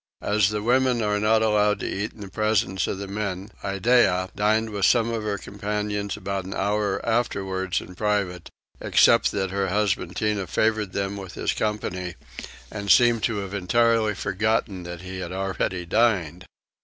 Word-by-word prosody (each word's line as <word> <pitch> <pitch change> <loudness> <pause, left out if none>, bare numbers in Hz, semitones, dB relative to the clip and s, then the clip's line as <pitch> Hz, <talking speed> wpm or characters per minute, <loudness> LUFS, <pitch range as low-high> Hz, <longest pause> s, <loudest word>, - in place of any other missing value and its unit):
As 105 -2 +3
the 105 -1 -3
women 125 0 +2
are 105 0 +1
not 110 +1 +3
allowed 105 -1 +2
to - - -2
eat 105 +3 -3
in 105 -3 -9
presence 105 -3 0
of - - -3
the 100 0 -6
men 100 0 -4
Iddeah 95 -2 +2
dined 110 +2 +1
with 100 -2 +2
some 115 -1 +3
of 115 -1 -2
her 105 -1 -2
companions 105 0 -3
about 100 0 -3
an 95 +2 -6
hour 100 -1 -1
afterwards 95 -5 -1
in 90 - -11
private, 100 -3 -1 0.3
except - - +4
that 95 -2 -1
her 100 0 0
husband 105 +1 0
Tinah 105 -3 -1
favoured 110 -2 0
them 100 0 -2
with 95 -2 -8
his - - -1
company 90 -4 -3 0.6
and 100 -1 -5
seemed 120 +1 +5
to 115 - -1
have 100 0 -7
entirely 110 +2 +2
forgotten 105 -1 -1
that 85 0 -7
he 95 0 -7
had 90 -2 -5
already 95 -1 -2
dined. 95 -4 +1
100 Hz, 170 wpm, -24 LUFS, 95-110 Hz, 0.6 s, seemed